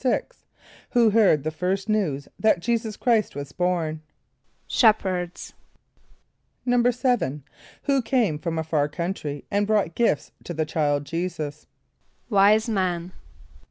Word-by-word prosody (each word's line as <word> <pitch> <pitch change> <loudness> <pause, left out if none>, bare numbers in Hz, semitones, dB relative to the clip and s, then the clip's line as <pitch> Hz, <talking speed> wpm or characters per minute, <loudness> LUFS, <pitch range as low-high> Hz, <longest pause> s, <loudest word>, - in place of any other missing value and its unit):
= - - -26
Who 230 -2 +5
heard 200 -10 +4
the 155 - -2
first 185 +5 -2
news 175 -11 0
that 220 -5 +3
J[=e]´[s+]us 225 +1 -1
Chr[=i]st 230 - +1
was 140 0 -6
born? 165 -2 -1 0.6
=Shepherds.= 185 -6 +1 1.1
=7.= 245 - +1 0.4
Who 275 -2 +2
came 225 - +1
from 165 0 -3
a 160 - 0
far 150 -2 0
country 150 -3 -4
and 205 0 +1
brought 205 -6 +1
gifts 195 -11 +1
to 175 - -5
the 160 0 0
child 145 -2 0
J[=e]´[s+]us? 155 -3 -4 0.6
=Wise 210 +3 +5
men. 185 -5 -1
180 Hz, 125 wpm, -24 LUFS, 155-220 Hz, 1.1 s, Who